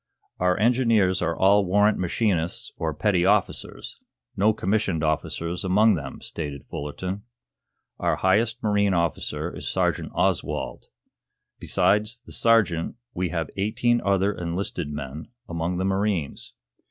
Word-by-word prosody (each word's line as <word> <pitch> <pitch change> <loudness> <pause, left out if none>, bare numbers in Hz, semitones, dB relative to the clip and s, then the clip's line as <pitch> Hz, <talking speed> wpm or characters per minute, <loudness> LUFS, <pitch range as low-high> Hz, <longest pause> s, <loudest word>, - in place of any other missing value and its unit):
"Our 90 0 +2
engineers 110 -5 +3
are 85 - -1
all 100 +2 +5
warrant 105 +3 +3
machinists 90 -2 -1
or 80 -1 -2
petty 90 +3 +1
officers; 100 +1 0 0.4
no 105 +3 +4
commissioned 95 -5 0
officers 85 +3 -1
among 105 +4 +4
them," 70 -6 -5
stated 75 -3 -6
Fullerton. 90 +7 -4 0.8
"Our - - +1
highest 110 +5 +1
marine 100 -2 +2
officer 85 -1 -2
is - - -4
Sergeant - - 0
Oswald. - - -1 0.7
Besides 105 +4 +1
the - - -12
sergeant 105 -8 +2 0.2
we 90 -1 -1
have 80 -1 -3
eighteen 120 +4 +1
other 100 +1 +2
enlisted 85 -2 -3
men 75 +1 -6 0.2
among 85 +1 -2
the 95 - -1
marines. 95 -6 -2
95 Hz, 125 wpm, -25 LUFS, 85-105 Hz, 0.8 s, all